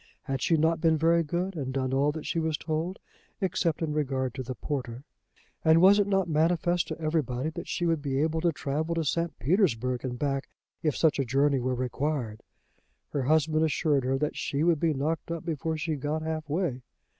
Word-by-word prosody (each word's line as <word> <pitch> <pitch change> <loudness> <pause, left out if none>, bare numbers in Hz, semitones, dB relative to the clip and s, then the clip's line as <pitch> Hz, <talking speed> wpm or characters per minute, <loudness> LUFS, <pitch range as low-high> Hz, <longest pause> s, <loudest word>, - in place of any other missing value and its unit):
Had 135 -2 -3
she 165 - +3
not 160 +1 +2
been 160 -2 +4
very 165 +2 +4
good, 175 +4 -2
and 135 -5 -3
done 130 -1 -1
all 140 +2 +3
that 155 0 -7
she 165 - -1
was 160 -2 0
told, 160 +5 -3 0.4
except 180 -4 0
in 155 -2 -1
regard 130 -4 -1
to 130 - -5
the 130 0 -5
porter? 125 -4 -4 0.6
And 160 0 +6
was 195 +4 +7
it 205 - +2
not 195 -2 +1
manifest 170 +2 +1
to - - -5
everybody 155 -3 -1
that - - -7
she 175 - -1
would 165 -3 +1
be 135 -2 -1
able 160 +2 +1
to 170 0 +3
travel 155 +2 -2
to 165 - 0
St. 165 +3 -1
Petersburg 125 - +1
and 125 -2 -3
back 135 0 -2 0.3
if 150 -3 0
such 160 -3 +3
a - - +3
journey 135 +2 +2
were 125 +1 -1
required? 125 -3 -2 0.7
Her 145 - -1
husband 155 +3 +2
assured 150 -3 +1
her 130 +1 +1
that 150 +2 -1
she 145 +2 -1
would 170 -2 +3
be 160 -1 +1
knocked 155 +5 -2
up 165 0 -4
before 160 -1 -2
she 160 +1 -2
got 150 +3 -2
half 160 -1 -4
way. 155 -5 -1
155 Hz, 205 wpm, -28 LUFS, 135-165 Hz, 0.7 s, was